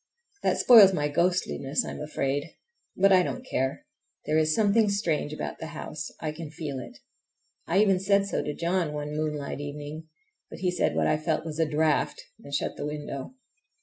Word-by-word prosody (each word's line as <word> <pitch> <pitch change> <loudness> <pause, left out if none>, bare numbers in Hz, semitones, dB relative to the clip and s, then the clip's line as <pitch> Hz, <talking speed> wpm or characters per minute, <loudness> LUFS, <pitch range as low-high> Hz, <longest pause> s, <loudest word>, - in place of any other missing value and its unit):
That - - +1
spoils 215 -6 +8
my 150 -4 0
ghostliness, 165 -3 0
I - - -5
am - - -7
afraid; 145 0 -2 0.4
but 195 +1 +5
I 185 - +6
don't 250 +8 -4
care—there 140 - -3
is 155 0 +2
something 215 0 +3
strange 170 -7 0
about 155 - -5
the 160 - -5
house—I 155 +1 -5
can 155 0 -8
feel 150 -3 -5
it. 125 - -10 0.7
I 175 - +1
even 195 -3 +3
said 200 +1 +3
so 200 - -1
to 150 - -4
John 170 -2 0
one 150 0 -4
moonlight 150 -2 -3
evening, 145 +2 -7 0.4
but - - -9
he 180 -1 +1
said 180 - 0
what - - +2
I 155 - +2
felt 155 +1 -1
was 155 -1 -5
a 160 -2 +2
draught, 155 0 +1 0.2
and 140 - -11
shut 140 - -2
the 145 - -3
window. 150 - -6
155 Hz, 180 wpm, -27 LUFS, 150-185 Hz, 0.7 s, spoils